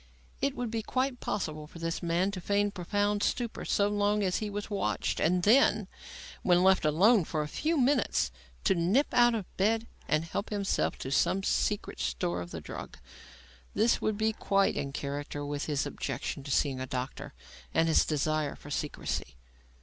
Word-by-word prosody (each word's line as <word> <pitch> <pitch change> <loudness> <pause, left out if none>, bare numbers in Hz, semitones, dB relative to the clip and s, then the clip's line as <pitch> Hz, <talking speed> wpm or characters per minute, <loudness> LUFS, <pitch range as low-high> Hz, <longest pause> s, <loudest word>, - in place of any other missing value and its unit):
It 275 0 +1
would 245 -4 -3
be 225 -1 -1
quite 255 +2 -1
possible 155 -6 -3
for 165 - -13
this 165 0 -3
man 175 +3 +1
to 190 -2 -6
feign 205 +2 +1
profound 205 +2 0
stupor 235 +1 -1
so 200 - +2
long 205 0 +1
as 185 -2 +1
he 215 - -3
was 205 0 -4
watched, 195 - -1
and 180 +2 +2
then, 215 -2 +4 0.5
when 180 0 +4
left 190 -3 +4
alone 190 +8 +5
for 155 -1 -2
a - - -5
few 315 - -1
minutes, 255 - +2 0.3
to - - +4
nip 190 - +2
out 240 -1 +5
of 210 -4 -3
bed 220 +4 +2 0.2
and 155 +1 +1
help 200 +5 -4
himself 200 -2 0
from 130 - -6
some 190 +7 +2
secret 210 - 0
store 65 +8 -1
of 85 - -7
the 80 - -6
drug. - - -8 0.8
This 230 +2 +3
would 215 -1 0
be 220 +1 +1
quite 195 -2 +2
in 140 - -3
character 145 +1 -4
with 145 0 -3
his 145 -3 0
objection 140 +1 -4
to - - -6
seeing 135 -1 +1
a 130 - -4
doctor 135 +3 -5 0.4
and 165 - +2
his 160 - +5
desire 155 -1 0
for 145 - -12
secrecy. 145 - -3
185 Hz, 180 wpm, -30 LUFS, 150-210 Hz, 0.8 s, alone